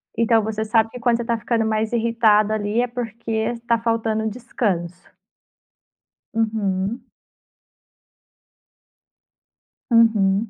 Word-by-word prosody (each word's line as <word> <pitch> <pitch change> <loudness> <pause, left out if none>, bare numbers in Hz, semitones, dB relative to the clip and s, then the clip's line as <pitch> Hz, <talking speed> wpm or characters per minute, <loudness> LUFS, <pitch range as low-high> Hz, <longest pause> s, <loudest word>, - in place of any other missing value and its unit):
Então 230 -1 +3
você 220 0 -2
sabe 225 0 +2
que 250 - -8
quando 235 0 +2
você 235 - -4
tá 235 -1 0
ficando 225 0 -1
mais 220 0 -1
irritada 220 -2 +3
ali 215 +2 0
é 245 - 0
porque 230 -1 -3
tá 235 - +3
faltando 225 -1 -1
descanso? 195 -7 -3 1.2
Uhum. 215 -1 -2 2.8
Uhum. 220 -2 +3
225 Hz, 105 wpm, -21 LUFS, 215-230 Hz, 2.8 s, Então